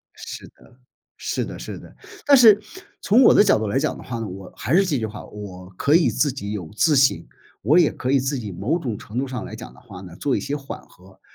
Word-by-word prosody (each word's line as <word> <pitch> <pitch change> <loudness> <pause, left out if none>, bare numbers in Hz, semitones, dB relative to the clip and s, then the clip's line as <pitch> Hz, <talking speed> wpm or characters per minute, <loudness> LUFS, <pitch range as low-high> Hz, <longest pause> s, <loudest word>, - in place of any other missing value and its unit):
是 - - -9
的， 125 - -22 0.4
是 - - -3
的 - - -8
是 - - -7
的。 - - -15 0.3
但 285 - +7
是， 220 -5 +7 0.4
从 230 +6 +4
我 - - +7
的 - - +7
角 - - +4
度 110 - -2
来 120 - 0
讲 155 - -1
的 - - -11
话 120 -2 -5
呢， 115 - -4
我 95 0 -10
还 130 - -2
是 195 +2 +5
这 150 -8 0
句 110 - -2
话， 105 0 -9
我 95 -3 -10
可 145 - +2
以 170 0 +5
自 145 -3 0
己 100 -6 -6
有 90 -7 -6
自 155 +3 +3
信， 135 0 +3 0.4
我 155 +5 +4
也 165 - +4
可 130 - -3
以 140 - +4
自 135 +2 -2
己 105 -5 -6
某 120 - -1
种 120 -10 -4
程 115 +4 -7
度 135 - -1
上 125 -3 -5
来 110 - -8
讲 115 +2 -10
的 - - -18
话 105 -7 -12
呢， 90 -3 -11
做 135 +6 0
一 - - -2
些 145 - -3
缓 140 -1 -8
和。 95 +1 -20
125 Hz, 280 characters per minute, -22 LUFS, 105-150 Hz, 0.4 s, 但